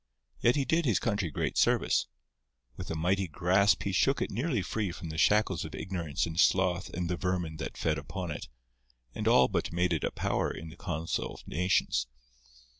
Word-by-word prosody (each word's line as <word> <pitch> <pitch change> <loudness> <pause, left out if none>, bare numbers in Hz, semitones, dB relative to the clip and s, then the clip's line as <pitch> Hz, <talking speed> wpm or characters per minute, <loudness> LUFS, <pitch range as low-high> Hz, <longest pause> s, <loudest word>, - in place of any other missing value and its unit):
Yet 120 - +3
he 140 -2 +1
did 165 +3 +1
his 115 -9 +3
country 100 -7 -1
great 70 - -1
service. - - +2 0.7
With - - -7
a 80 - -2
mighty 90 +4 +1
grasp 90 +5 +3
he 100 - -1
shook 135 +9 +2
it - - -2
nearly 125 - -1
free 105 -2 -2
from 85 -1 -7
the 80 - -6
shackles 100 -2 +3
of 80 - -7
ignorance 85 -6 -2
and 80 0 -4
sloth 95 -1 +3
and 90 -1 -3
the 90 0 -1
vermin 90 -4 -2
that - - -6
fed 75 -2 0
upon 90 +4 -5
it, 75 - -6 0.7
and - - -3
all 65 - +6
but - - -2
made 90 +1 +1
it 80 - -1
a - - +1
power - - -1
in 80 - -7
the 80 - -12
council 85 -1 -3
of - - -15
nations. 75 -8 +1
90 Hz, 195 wpm, -30 LUFS, 80-100 Hz, 0.7 s, all